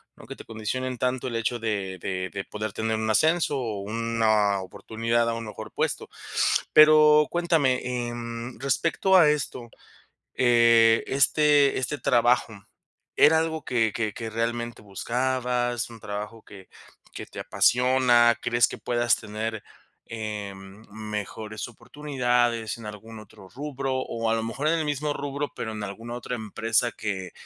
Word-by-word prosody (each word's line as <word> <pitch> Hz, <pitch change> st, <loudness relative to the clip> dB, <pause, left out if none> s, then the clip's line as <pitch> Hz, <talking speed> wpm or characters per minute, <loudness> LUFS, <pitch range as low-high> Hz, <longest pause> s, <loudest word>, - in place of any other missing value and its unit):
¿no?, -, -, -14 dB
que -, -, -9 dB
te -, -, -11 dB
condicionen 125 Hz, +3 st, -4 dB
tanto 125 Hz, +1 st, -1 dB
el 120 Hz, -, -4 dB
hecho 115 Hz, +1 st, -1 dB
de 100 Hz, -4 st, -3 dB
de 95 Hz, 0 st, -3 dB
de 95 Hz, -1 st, -6 dB
poder 105 Hz, 0 st, -5 dB
tener 110 Hz, +2 st, -2 dB
un 110 Hz, 0 st, -2 dB
ascenso 155 Hz, +5 st, +2 dB
o 110 Hz, -6 st, -3 dB
una 110 Hz, -2 st, +1 dB
oportunidad 115 Hz, +5 st, -1 dB
a -, -, -1 dB
un 115 Hz, -1 st, -5 dB
mejor 105 Hz, 0 st, -9 dB
puesto. -, -, -2 dB, 0.7 s
Pero 155 Hz, -1 st, +7 dB
cuéntame, 160 Hz, -7 st, +1 dB, 0.3 s
em, 120 Hz, 0 st, -6 dB
respecto 165 Hz, +8 st, +2 dB
a 160 Hz, -4 st, +6 dB
esto, 140 Hz, -5 st, -2 dB, 0.7 s
eh, 115 Hz, -2 st, +5 dB
¿este 145 Hz, +1 st, +3 dB
este 145 Hz, +3 st, -2 dB
trabajo 120 Hz, -2 st, +2 dB, 0.6 s
era 160 Hz, +1 st, +6 dB
algo 160 Hz, -2 st, -2 dB
que 115 Hz, -5 st, +1 dB
que 110 Hz, -3 st, -2 dB
que 115 Hz, +1 st, -6 dB
realmente 115 Hz, 0 st, -3 dB
buscabas? 120 Hz, +3 st, -1 dB
¿Un 115 Hz, -, -11 dB
trabajo 105 Hz, +2 st, -6 dB
que 95 Hz, -2 st, -14 dB, 0.5 s
que -, -, -7 dB
te -, -, -10 dB
apasiona? 125 Hz, -2 st, +3 dB
¿Crees 120 Hz, -1 st, +3 dB
que -, -, -8 dB
puedas 120 Hz, -1 st, +1 dB
tener, 110 Hz, 0 st, -5 dB, 0.4 s
em, 105 Hz, -2 st, -7 dB
mejores 105 Hz, +1 st, -6 dB
oportunidades 120 Hz, -4 st, -1 dB
en 110 Hz, -, -10 dB
algún 110 Hz, +2 st, -9 dB
otro 95 Hz, -3 st, -15 dB
rubro 135 Hz, -1 st, -4 dB
o 115 Hz, -3 st, -3 dB
a 115 Hz, -, +2 dB
lo 110 Hz, -, -2 dB
mejor 135 Hz, +7 st, -3 dB
en 165 Hz, 0 st, +2 dB
el 155 Hz, -, -1 dB
mismo 145 Hz, 0 st, -1 dB
rubro, 145 Hz, 0 st, -4 dB
pero 110 Hz, -1 st, -4 dB
en 105 Hz, -, -5 dB
alguna 115 Hz, +4 st, -7 dB
otra 125 Hz, 0 st, -5 dB
empresa 115 Hz, +2 st, 0 dB
que, 95 Hz, -4 st, -4 dB
115 Hz, 150 wpm, -25 LUFS, 110-130 Hz, 0.7 s, Pero